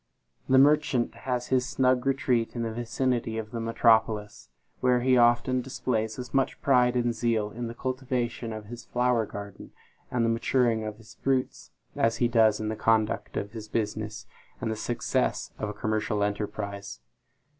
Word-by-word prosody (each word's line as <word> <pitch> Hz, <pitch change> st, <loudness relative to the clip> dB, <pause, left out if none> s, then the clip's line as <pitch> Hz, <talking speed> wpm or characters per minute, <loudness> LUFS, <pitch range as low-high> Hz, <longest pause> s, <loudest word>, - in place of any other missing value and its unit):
The 130 Hz, -, +5 dB
merchant 140 Hz, -3 st, +4 dB
has 125 Hz, -1 st, -3 dB
his 130 Hz, 0 st, +1 dB
snug 130 Hz, 0 st, +2 dB
retreat 125 Hz, -4 st, +1 dB
in 120 Hz, -, -2 dB
the 115 Hz, -1 st, -3 dB
vicinity 120 Hz, -1 st, -1 dB
of 110 Hz, -1 st, -5 dB
the 115 Hz, -, -4 dB
metropolis, 110 Hz, -2 st, +2 dB, 0.3 s
where 125 Hz, -1 st, +3 dB
he 130 Hz, +1 st, +4 dB
often 120 Hz, +1 st, +3 dB
displays 110 Hz, -4 st, -2 dB
as 125 Hz, 0 st, -7 dB
much 135 Hz, -1 st, +1 dB
pride 125 Hz, -2 st, +3 dB
and 120 Hz, -1 st, +1 dB
zeal 110 Hz, -2 st, 0 dB
in 120 Hz, +2 st, -5 dB
the 115 Hz, -, -7 dB
cultivation 125 Hz, -3 st, -2 dB
of 110 Hz, -1 st, -6 dB
his 120 Hz, +2 st, -9 dB
flower 120 Hz, -2 st, +1 dB
garden, 100 Hz, 0 st, -9 dB, 0.4 s
and 120 Hz, -2 st, +1 dB
the -, -, +2 dB
maturing 115 Hz, 0 st, +1 dB
of 105 Hz, 0 st, -5 dB
his 110 Hz, 0 st, -15 dB
fruits, 130 Hz, -1 st, -1 dB, 0.3 s
as 115 Hz, 0 st, +1 dB
he 120 Hz, -, +2 dB
does 110 Hz, -3 st, +4 dB
in 110 Hz, 0 st, -2 dB
the 110 Hz, -, -2 dB
conduct 110 Hz, -1 st, +1 dB
of 100 Hz, -, -3 dB
his 110 Hz, -1 st, -8 dB
business, 110 Hz, -1 st, -3 dB, 0.3 s
and 110 Hz, -, -2 dB
the -, -, -2 dB
success 120 Hz, +2 st, -1 dB
of 105 Hz, -, -2 dB
a -, -, -4 dB
commercial 110 Hz, -1 st, -1 dB
enterprise. 100 Hz, -, -4 dB
115 Hz, 170 wpm, -27 LUFS, 110-125 Hz, 0.4 s, The